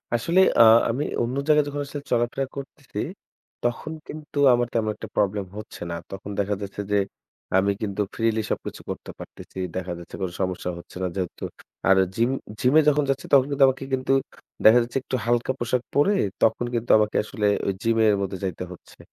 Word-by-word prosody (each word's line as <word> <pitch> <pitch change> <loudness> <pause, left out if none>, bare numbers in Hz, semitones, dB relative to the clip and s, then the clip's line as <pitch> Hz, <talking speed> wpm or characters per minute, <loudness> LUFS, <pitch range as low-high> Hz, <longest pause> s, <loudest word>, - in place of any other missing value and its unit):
আসলে 165 +10 +2 0.2
আ - - +11 0.3
আমি 125 +6 0 0.2
অন্য 120 +2 -2
জায়গায় 150 -1 +5
যখন 145 0 -3
আসলে 145 +1 -6
চলাফেরা 120 +3 +1
করতেছি 140 -1 -8 0.6
তখন 120 +6 -2 0.2
কিন্তু 150 -1 -9 0.2
আমার 120 0 +2
তেমন 110 -2 +1
একটা - - -8
problem 100 -1 +1
হচ্ছে 105 - -9
না। - - -2 0.2
তখন 95 +1 -7
দেখা 100 0 +1
যাচ্ছে 100 0 -5
যে, 105 - +4 0.6
আমি 100 +1 +3
কিন্তু 105 -1 -2
freely 115 -1 +1
সবকিছু - - -4
করতে - - -6
পারতেছি। - - -11 0.2
দেখা 90 -1 -3
যাচ্ছে 85 - -10
কোন 95 - -1
সমস্যা 90 -1 -2
হচ্ছে 85 - -11
না। - - +1
যেহেতু 90 -3 -4 0.5
আর 95 - +6 0.2
gym 115 +2 +2 0.3
gym-এ 140 +5 +5
যখন 150 0 +2
যাচ্ছি 135 0 -1
তখন 135 -2 +7
কিন্তু 140 -1 +3
আমাকে 130 0 -1
কিন্তু 130 0 +1 0.5
দেখা 110 +3 +9
যাচ্ছে 120 +2 -4
একটু 130 - -3
হালকা 120 +2 +1
পোশাক 120 +1 0
পড়ে 145 +9 +4 0.3
তখন 115 +2 +3
কিন্তু 115 0 0
আমাকে 105 0 +1
আসলে 110 -1 -3 0.2
ওই 100 - +1
gym 115 0 +1
এর 105 -1 +5
মধ্যে 95 0 -3
যাইতে 90 -2 -3
হচ্ছে। 90 - -14
115 Hz, 185 wpm, -24 LUFS, 100-135 Hz, 0.6 s, আ